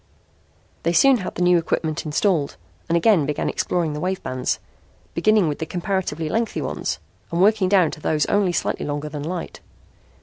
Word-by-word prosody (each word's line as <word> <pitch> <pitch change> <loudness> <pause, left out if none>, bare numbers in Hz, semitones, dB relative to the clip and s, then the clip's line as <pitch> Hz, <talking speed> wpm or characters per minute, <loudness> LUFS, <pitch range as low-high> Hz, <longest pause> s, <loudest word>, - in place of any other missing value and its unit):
They 170 - 0
soon 270 +9 +6
had 185 - -5
the 180 - 0
new 180 -1 +5
equipment 160 -1 -2
installed 155 -1 +1 0.3
and 170 - +3
again 170 -5 +4
began 150 - -1
exploring 170 -4 -1
the 150 - -4
wave 185 +3 -2
bands, 130 0 -1 0.6
beginning 210 +1 +3
with 150 - -2
the 160 - -3
comparatively 175 -4 -2
lengthy 225 +6 -1
ones - - -3 0.3
and 170 - -1
working 200 -1 +4
down 190 -3 +5
into 155 - -4
those 150 -1 +1
only 200 -3 +2
slightly - - -1
longer 145 +1 -3
than 150 -1 -6
light. 170 +3 -5
170 Hz, 175 wpm, -22 LUFS, 155-190 Hz, 0.6 s, soon